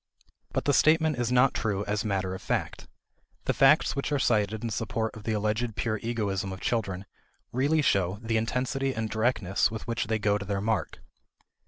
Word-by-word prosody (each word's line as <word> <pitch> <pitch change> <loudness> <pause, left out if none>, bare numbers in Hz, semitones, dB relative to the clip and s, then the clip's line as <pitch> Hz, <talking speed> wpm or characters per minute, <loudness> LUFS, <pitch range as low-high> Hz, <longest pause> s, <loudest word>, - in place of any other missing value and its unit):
But - - -2
the 145 - +3
statement 155 -1 +4
is 120 0 0
not 125 +1 +4
true 105 -2 -1
as 105 0 -1
matter 95 -3 -1
of 95 - -7
fact. - - -3 0.6
The - - +1
facts - - +4
which 140 +1 -2
are 145 - +2
cited 110 -4 +1
in 115 - -2
support 110 +1 -2
of 110 -1 -11
the 110 - 0
alleged 105 +2 -1
pure 110 -2 -1
egoism 100 -5 -2
of 95 - -7
children 100 -5 -2 0.5
really 145 +5 +2
show 95 -5 +2
the 115 0 -1
intensity 130 +4 -1
and 110 -1 -3
directness 110 -4 +1
with 110 -1 -6
which 115 -1 -2
they 110 0 +1
go 105 -1 +1
to 100 - -6
their 100 0 -1
mark. 110 0 -2
110 Hz, 190 wpm, -28 LUFS, 100-120 Hz, 0.6 s, statement